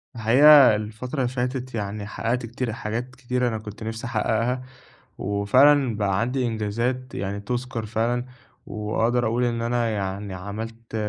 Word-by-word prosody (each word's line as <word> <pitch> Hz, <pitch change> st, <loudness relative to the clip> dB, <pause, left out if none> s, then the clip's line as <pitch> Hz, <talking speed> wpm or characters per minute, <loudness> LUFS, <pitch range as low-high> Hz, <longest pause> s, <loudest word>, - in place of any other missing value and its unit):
الحقيقة 130 Hz, +3 st, +7 dB
الفترة 110 Hz, +6 st, -5 dB
اللي 130 Hz, -2 st, +1 dB
فاتت 125 Hz, 0 st, -3 dB
يعني 100 Hz, 0 st, -4 dB
حقّقت 115 Hz, +3 st, -2 dB
كتير 115 Hz, 0 st, -3 dB
حاجات 120 Hz, +4 st, -4 dB
كتيرة 125 Hz, -1 st, -1 dB
أنا 110 Hz, -, -1 dB
كنت 105 Hz, 0 st, -9 dB
نِفْسي 110 Hz, +1 st, -5 dB
أحقّقها 120 Hz, +2 st, 0 dB, 0.6 s
وفعلًا 125 Hz, +6 st, +3 dB
بقى 100 Hz, -2 st, 0 dB
عندي 125 Hz, +2 st, 0 dB
إنجازات 115 Hz, +3 st, -2 dB
يعني 100 Hz, +1 st, -3 dB
تُذكَر 120 Hz, +1 st, -3 dB
فعلًا، 120 Hz, +3 st, 0 dB, 0.4 s
وأقدر 110 Hz, +3 st, 0 dB
أقول 120 Hz, +3 st, +1 dB
إن 115 Hz, -1 st, -1 dB
أنا 120 Hz, 0 st, 0 dB
يعني 100 Hz, -1 st, -3 dB
عملت 110 Hz, +5 st, -7 dB
115 Hz, 140 wpm, -24 LUFS, 105-125 Hz, 0.6 s, الحقيقة